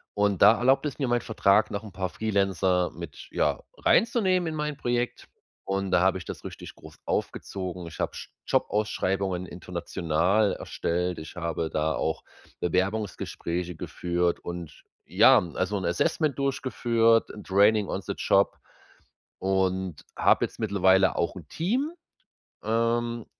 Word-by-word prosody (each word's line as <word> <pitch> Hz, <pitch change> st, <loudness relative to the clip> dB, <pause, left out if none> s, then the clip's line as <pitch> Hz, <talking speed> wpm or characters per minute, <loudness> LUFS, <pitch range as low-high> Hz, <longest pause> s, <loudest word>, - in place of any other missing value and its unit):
und 100 Hz, -2 st, +1 dB
da 110 Hz, +3 st, +8 dB
erlaubt 135 Hz, +3 st, +3 dB
es 145 Hz, -, -3 dB
mir 135 Hz, -, 0 dB
mein 120 Hz, 0 st, +1 dB
Vertrag, 105 Hz, -1 st, +2 dB
noch 100 Hz, +2 st, -4 dB
'n 105 Hz, -, -10 dB
paar 95 Hz, -1 st, -2 dB
Freelancer 95 Hz, -4 st, +1 dB
mit, 85 Hz, -4 st, -9 dB
ja, -, -, 0 dB, 0.2 s
reinzunehmen 190 Hz, -5 st, +3 dB
in 160 Hz, -, -3 dB
mein 150 Hz, -1 st, -3 dB
Projekt 120 Hz, -2 st, -2 dB, 0.4 s
und 95 Hz, -1 st, -2 dB
da 90 Hz, -1 st, +4 dB
habe 95 Hz, 0 st, +3 dB
ich -, -, -10 dB
das -, -, -7 dB
richtig -, -, -9 dB
groß -, -, -14 dB
aufgezogen. 90 Hz, -2 st, -3 dB
Ich 80 Hz, -, -11 dB
hab -, -, -2 dB
J -, -, -7 dB, 0.2 s
Jobausschreibungen 95 Hz, -3 st, 0 dB
international 90 Hz, +3 st, 0 dB
erstellt. 90 Hz, +1 st, -2 dB
Ich 80 Hz, +2 st, -9 dB
habe 85 Hz, -1 st, -2 dB
da 80 Hz, 0 st, 0 dB
auch 80 Hz, 0 st, -2 dB, 0.4 s
Bewerbungsgespräche 90 Hz, -2 st, -2 dB
geführt 85 Hz, +2 st, -1 dB
und 85 Hz, -3 st, -7 dB, 0.2 s
ja, -, -, +6 dB, 0.2 s
also 95 Hz, +2 st, -1 dB
'n 95 Hz, -, -3 dB
Assessment 140 Hz, -, 0 dB
durchgeführt, 120 Hz, -4 st, +2 dB
'n 105 Hz, -, -10 dB
Training 100 Hz, +2 st, +3 dB
on -, -, -2 dB
the -, -, -3 dB
Job 100 Hz, 0 st, +2 dB, 0.8 s
und 95 Hz, -3 st, -1 dB
hab -, -, +4 dB
jetzt -, -, -4 dB
mittlerweile 95 Hz, -3 st, +3 dB
auch 85 Hz, -, 0 dB
'n 85 Hz, -5 st, -10 dB
Team, 250 Hz, -, -1 dB, 0.7 s
ähm, 115 Hz, +1 st, 0 dB
95 Hz, 145 wpm, -27 LUFS, 90-115 Hz, 0.8 s, da